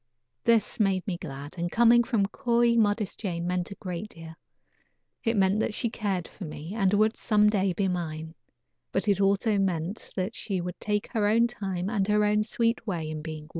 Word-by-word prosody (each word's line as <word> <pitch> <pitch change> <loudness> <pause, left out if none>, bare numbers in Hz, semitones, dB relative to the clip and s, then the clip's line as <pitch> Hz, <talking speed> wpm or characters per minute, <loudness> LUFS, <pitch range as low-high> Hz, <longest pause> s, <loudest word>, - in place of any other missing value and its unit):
This 230 -1 +2
made 195 -3 +2
me 190 - -2
glad, 145 -1 -8
and 175 0 -2
coming 240 +1 +5
from 230 -5 +1
coy, 235 +1 +2
modest 210 -2 +1
Jane 170 -5 -3
meant 180 0 -1
a 200 - -8
great 185 +2 -5
deal. 165 -3 -11 0.9
It 230 -1 +1
meant 195 +1 +3
that 220 - -1
she 235 - -1
cared 195 -7 -2
for 205 - -11
me, 155 +2 -7
and 195 -4 +2
would, 215 +2 +3
some 210 -2 +3
day, 195 -2 +2
be 195 +2 0
mine; 160 -3 -4 0.6
but 195 - -1
it 200 -1 +3
also 200 +2 +2
meant 185 +1 -2
that 190 +3 -2
she 195 -6 -3
would 175 0 -5
take 210 -1 -2
her 215 -4 +1
own 230 +3 +4
time 190 -5 -3
and 200 -2 0
her 210 0 +3
own 210 0 +2
sweet 230 +1 -1
way 165 -5 -2
in 155 -1 -5
being 155 -1 -6
won. 155 - -16
195 Hz, 205 wpm, -27 LUFS, 175-215 Hz, 0.9 s, coming